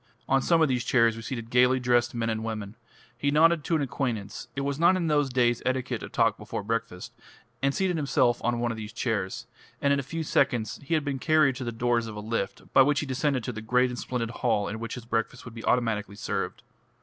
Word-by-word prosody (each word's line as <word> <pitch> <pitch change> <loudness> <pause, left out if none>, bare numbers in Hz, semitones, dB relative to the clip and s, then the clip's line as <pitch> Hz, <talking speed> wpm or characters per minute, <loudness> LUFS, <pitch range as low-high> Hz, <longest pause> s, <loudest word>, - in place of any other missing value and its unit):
On 135 0 +3
some 165 +3 +3
of - - +4
these 125 -3 0
chairs 115 -3 +3
were 115 - -7
seated 115 0 -6
gaily 125 +1 +4
dressed 120 -1 +2
men 115 -1 -1
and 110 0 -3
women. 110 -2 -5 0.4
He 140 +4 -1
nodded 160 +2 +4
to 170 - +1
an 150 - +1
acquaintance 115 -6 -3
it 140 - -2
was 140 +1 -2
not 170 +3 +5
in 180 -2 -1
those 145 -3 +2
days 120 -2 +2
etiquette 130 -1 -1
to - - -7
talk - - +1
before - - -5
breakfast 105 -4 -3 0.5
and 140 0 +2
seated 185 +2 0
himself 135 -5 +1
on 120 0 +1
one 120 0 0
of 115 - -5
these 105 0 -7
chairs, 110 -4 -2 0.3
and 140 0 +3
in 140 - +1
a - - 0
few 160 +5 -4
seconds 125 -7 +1
he 145 +4 -1
had 155 -2 0
been 140 -2 -2
carried 155 -3 +3
to 130 - -5
the 120 - -3
doors 115 0 0
of 110 - -7
a - - -5
lift, 110 +2 -4
by - - +8
which 145 +2 +3
he - - -3
descended 135 -1 0
to 125 - -3
the 110 -2 -7
great 125 +3 +2
and 125 - -5
splendid 115 -2 -3
hall 115 -4 0
in 110 +1 -5
which 115 0 -5
his 125 -2 -9
breakfast 115 +2 -2
would 125 - -9
be 115 - -8
automatically 110 -4 0
served. 100 - -3
125 Hz, 245 wpm, -27 LUFS, 115-140 Hz, 0.5 s, by